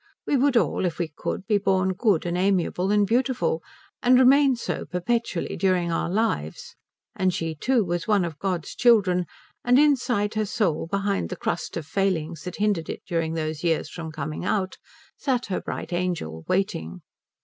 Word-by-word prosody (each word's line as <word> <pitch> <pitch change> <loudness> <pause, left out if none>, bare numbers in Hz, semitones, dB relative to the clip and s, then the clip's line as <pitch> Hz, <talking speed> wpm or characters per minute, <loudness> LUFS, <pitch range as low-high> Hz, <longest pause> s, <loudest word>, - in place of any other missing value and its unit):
We - - +1
would 270 -1 +3
all - - +1
if 170 - -4
we 170 -3 -2
could 195 - -4
be 210 -1 +2
born 190 -1 +1
good 195 -4 +1
and 175 0 -1
amiable 185 0 +1
and 205 0 +4
beautiful, 260 - +1 0.4
and 250 +1 +5
remain 265 +1 +6
so 235 - -3
perpetually 190 +1 -2
during 180 -2 +1
our 165 - -1
lives; 175 - -2 0.4
and 185 -1 +2
she 165 -2 -3
too 230 - +1
was 175 -1 -2
one 205 -4 +3
of 160 -3 -7
God's 180 -4 -2
children, 195 -7 +3 0.4
and 245 +1 +4
inside 250 -8 +2
her 215 -1 0
soul, 185 -7 0
behind 200 - -1
the - - -4
crust - - -3
of 165 - -5
failings 165 -3 -1
that 180 - -5
hindered 205 -6 0
it - - -5
during 165 -2 -1
these 155 0 -3
years 160 -2 0
from 165 -2 -6
coming 155 +1 -5
out, 190 0 -1 0.4
sat 255 -3 0
her - - -1
bright - - -5
angel, 170 - -3
waiting. 90 - -1
185 Hz, 175 wpm, -25 LUFS, 165-220 Hz, 0.4 s, remain